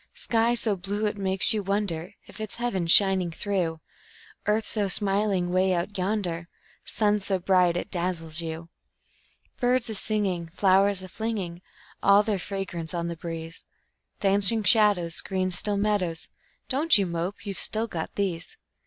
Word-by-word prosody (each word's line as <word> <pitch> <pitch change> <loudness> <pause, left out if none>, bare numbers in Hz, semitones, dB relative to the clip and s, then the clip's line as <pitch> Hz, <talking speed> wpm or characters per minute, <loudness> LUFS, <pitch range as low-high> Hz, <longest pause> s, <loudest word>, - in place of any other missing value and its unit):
Sky 230 +1 +1
so 220 -3 +1
blue 200 +3 -3
it 210 - -1
makes 190 0 +3
you 215 - -1
wonder 195 -2 -3
If 215 - -11
it's 215 - -6
heaven 235 -8 -2
shining 190 0 +5
through; 170 -2 -2 0.7
Earth 215 +1 +1
so 210 -3 -1
smiling 195 -2 0
'way 185 0 +2
out 175 +4 -3
yonder, 180 -3 -2 0.3
Sun 210 -1 +1
so 195 -1 -1
bright 180 -1 +2
it - - -5
dazzles 170 -2 -1
you; 165 0 -6 0.9
Birds 245 -2 +1
a - - -3
singing, 195 -5 -2
flowers 195 0 +3
a - - -8
flinging 190 -4 -4 0.4
All 200 +1 +5
their 210 -3 -1
fragrance 175 -4 -5
on 170 0 -2
the 170 - -4
breeze; 165 0 -8 0.5
Dancing 205 +2 +3
shadows, 200 -5 +3
green, 185 -1 -2
still 200 +3 0
meadows 200 -5 -1 0.4
Don't 285 +1 +4
you 200 - +1
mope, 175 +4 -4
you've 200 -2 -4
still 220 +1 +2
got 170 -8 -6
these. 195 - -3
195 Hz, 155 wpm, -26 LUFS, 175-210 Hz, 0.9 s, shining